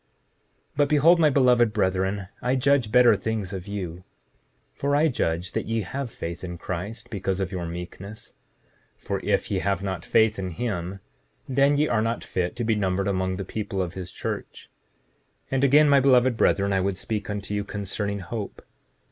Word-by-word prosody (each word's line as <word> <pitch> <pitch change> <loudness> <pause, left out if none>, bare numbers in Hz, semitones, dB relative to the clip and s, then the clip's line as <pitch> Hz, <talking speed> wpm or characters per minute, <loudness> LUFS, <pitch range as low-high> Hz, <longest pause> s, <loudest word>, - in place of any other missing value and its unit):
7:39 - - -44 0.7
But 145 -1 +3
behold, 160 +4 +5
my 155 -2 +5
beloved 125 -5 +4
brethren, 95 -1 0
I 125 +1 +1
judge 130 -3 +2
better 120 -2 +6
things 105 -2 -3
of 95 0 -6
you, 90 -4 -5 0.7
for 140 +1 0
I 155 +2 +4
judge 85 - -1
that - - -3
ye 115 0 0
have 125 +7 -4
faith 85 -5 -6
in 90 -1 -5
Christ 95 +7 -5
because 95 -2 -2
of 95 0 -2
your 90 -3 -4
meekness; 90 +5 -8 0.6
for - - -3
if - - 0
ye - - +1
have 100 0 -1
not 95 -4 -3
faith 110 -2 +3
in 95 -1 -3
him 95 -5 -3 0.5
then 140 +2 +3
ye 150 +1 +3
are 110 - +1
not 115 +1 -1
fit 90 +2 -2
to 120 - -3
be 110 0 +2
numbered 100 -2 0
among 95 -1 0
the 95 0 -5
people 100 -1 -4
of 90 -2 -2
his 95 -1 -7
church. - - -6 0.7
7:40 - - -44
And 135 0 +1
again, 150 +3 +6
my 140 -1 +6
beloved 130 -2 +4
brethren, 100 -2 +2
I 95 - +2
would 95 0 -1
speak 105 0 -4
unto 105 0 -4
you 105 0 -1
concerning 100 0 -3
hope. 100 +3 -6
105 Hz, 190 wpm, -25 LUFS, 95-125 Hz, 0.7 s, better